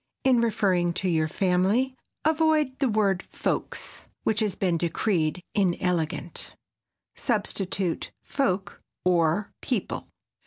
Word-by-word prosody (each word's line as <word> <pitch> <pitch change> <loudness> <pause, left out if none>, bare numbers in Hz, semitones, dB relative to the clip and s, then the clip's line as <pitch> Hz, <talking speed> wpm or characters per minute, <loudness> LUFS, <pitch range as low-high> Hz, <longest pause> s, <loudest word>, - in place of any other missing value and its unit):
In 255 -3 +5
referring 185 -6 +2
to 190 - -1
your 160 -3 +2
family 195 +9 +2 0.3
avoid 310 -4 +3
the 270 -3 +2
word 200 -4 +2
"folks" - - -3 0.2
which 220 -1 +2
has 210 -4 0
been 185 -4 +1
decreed 170 0 0
inelegant. 175 -3 0 0.6
Substitute 195 -5 -1
"folk" 200 -8 -1 0.2
or 175 +2 +2
"people." - - -2
195 Hz, 105 wpm, -27 LUFS, 175-225 Hz, 0.6 s, In